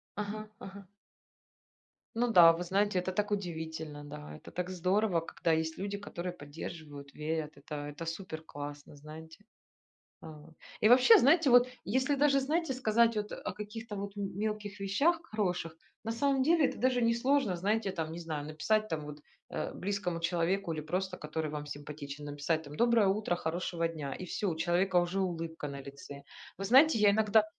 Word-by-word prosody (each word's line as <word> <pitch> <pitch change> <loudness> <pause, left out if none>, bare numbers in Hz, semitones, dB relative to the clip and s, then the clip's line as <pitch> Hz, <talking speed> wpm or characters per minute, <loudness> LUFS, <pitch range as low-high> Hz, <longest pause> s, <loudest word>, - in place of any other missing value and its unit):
Ага, 210 +1 -4
ага. 195 0 -10 1.3
Ну 240 0 +1
да, 170 -4 +9
вы 170 +2 -4
знаете, 195 +1 +1
это 185 +1 -2
так 210 +2 -1
удивительно, 160 -5 -4
да. 150 +1 -9
Это - - -13
так 180 0 -3
здорово, 185 +1 +1
когда 165 +1 -2
есть 160 0 0
люди, 200 +1 -3
которые 180 -3 -5
поддерживают, 145 -2 -9
верят, 155 0 -3
это 145 +1 -6
это 145 +3 -7
супер 165 -1 -5
классно, 145 -1 -8
знаете. 160 +5 -12 0.8
Вот. 155 +1 -12 0.3
И 215 - +5
вообще 255 - +8
знаете, 310 +1 +5
вот 245 0 +6 0.2
если 260 +7 +1
даже, 275 -1 +4
знаете, 305 +2 0
сказать 230 -2 +3
вот, 210 0 -2
а, - - -4
о - - -4
каких-то 210 +1 -7
вот 200 +1 -6
м 195 -2 -4
мелких 210 -1 -3
вещах 285 - +2
хороших, 180 - -2 0.3
на 225 - -2
самом 270 +2 +1
деле 320 0 +4
это - - -5
даже 250 +1 +2
несложно, 235 -2 +2
знаете 205 +3 0
там, 160 -3 -3
не 170 - -6
знаю, 155 -3 -4
написать 215 +8 0
там 155 -4 -3
вот, 150 0 -9 0.3
э, - - -3
близкому 180 -3 -3
человеку 175 +2 0
или 155 - -3
просто, 185 +3 -2
который 155 0 -3
вам 150 -1 -5
симпатичен, 145 0 -7
написать 145 +2 -1
там: 145 0 -10
"Доброе 235 -1 +4
утро, 190 -2 +1
хорошего 170 0 -2
дня". 155 -4 -5
И 185 - -6
всё, 195 +2 -1
у 160 - -3
человека 180 +3 +1
уже 175 +2 +2
улыбка 165 -4 -3
на 140 0 -6
лице. 140 +1 -10 0.3
Вы 195 - -4
знаете, 260 +4 +6
я 205 -1 +6
иногда 215 0 +4
180 Hz, 175 wpm, -31 LUFS, 160-215 Hz, 1.3 s, да